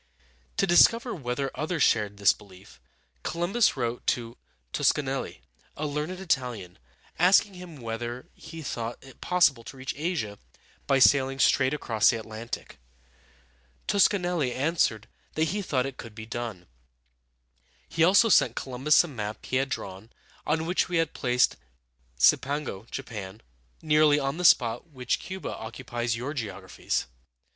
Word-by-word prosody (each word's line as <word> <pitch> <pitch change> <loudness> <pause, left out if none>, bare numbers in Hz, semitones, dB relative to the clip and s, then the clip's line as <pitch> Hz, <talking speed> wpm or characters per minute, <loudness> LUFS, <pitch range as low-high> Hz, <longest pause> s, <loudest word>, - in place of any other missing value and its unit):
To - - +3
discover 230 +7 +5
whether 135 -3 -3
others 155 +3 -1
shared 105 -2 +2
this 100 0 +5
belief, 100 -2 -17 0.4
Columbus 175 +4 +1
wrote 120 -1 -3
to 115 -1 -1 0.4
Tos - - +4
ca - - -3
nel´li, - - -4 0.4
a 155 - -3
learned 150 +5 -3
Italian, 125 - -2 0.4
asking 190 +3 +5
him 180 -3 -10
whether 120 +1 -5
he 165 -1 -10
thought 120 -3 -4
it 135 -1 -16
possible 160 -10 +3
to 135 - -10
reach 130 0 -4
Asia 145 - -3 0.5
by 135 - +4
sailing 135 0 +4
straight 130 -1 +3
across 110 -7 +2
the 120 - +1
Atlantic. 110 +1 -7 1.1
Toscanelli 180 -8 +2
answered 130 -7 0 0.3
that 155 0 +1
he 205 +1 -2
thought 135 -9 0
it 135 -1 -6
could 115 -3 -10
be 110 -1 -8
done. 115 -6 -6 1.2
He 165 - +1
also 200 +6 +6
sent 125 - +4
Columbus 135 +5 +3
a - - -6
map 110 -7 -6
he 130 - 0
had 135 +1 0
drawn, 100 -2 -6 0.4
on 160 +1 +1
which 180 +2 +1
he 180 - -4
had 165 -2 +1
placed 125 -1 +1 0.6
Cipango 115 - +1
(Japan) 105 -2 -7 0.4
nearly 150 -1 +4
on 135 +2 -2
the 180 - -2
spot 120 +2 +4
which 130 -4 -2
Cu´ba 190 +1 -6
occupies 120 0 -3
in 115 - -6
your 140 +4 -3
geographies. 100 -8 -3
130 Hz, 145 wpm, -27 LUFS, 115-160 Hz, 1.2 s, also